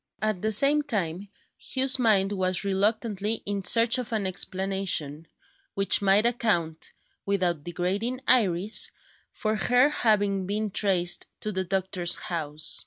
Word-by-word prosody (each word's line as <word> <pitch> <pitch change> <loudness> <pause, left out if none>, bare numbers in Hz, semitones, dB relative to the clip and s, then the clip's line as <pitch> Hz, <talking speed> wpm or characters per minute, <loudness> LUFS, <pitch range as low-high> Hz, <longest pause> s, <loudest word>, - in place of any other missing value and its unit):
At 215 -3 -2
the 220 - -1
same 280 +7 +4
time, 200 - -3 0.3
Hugh's 265 0 0
mind 205 -5 +2
was 185 -2 -1
reluctantly 210 +2 -1
in 200 -1 -3
search 230 +6 +3
of 245 -2 -6
an 215 -3 -2
explanation, 185 -5 -1 0.5
which 195 +1 +3
might 200 +2 +3
account 175 -9 -1 0.3
(without 180 -6 -1
degrading 195 - -3
Iris) 205 -3 +3 0.4
for 215 0 -3
her 245 +8 +3
having 205 -7 0
been 210 +1 -3
traced 185 -3 0
to 215 - -3
the 190 -1 -3
doctor's 185 -1 0
house. 155 -3 -4
200 Hz, 130 wpm, -25 LUFS, 180-220 Hz, 0.5 s, same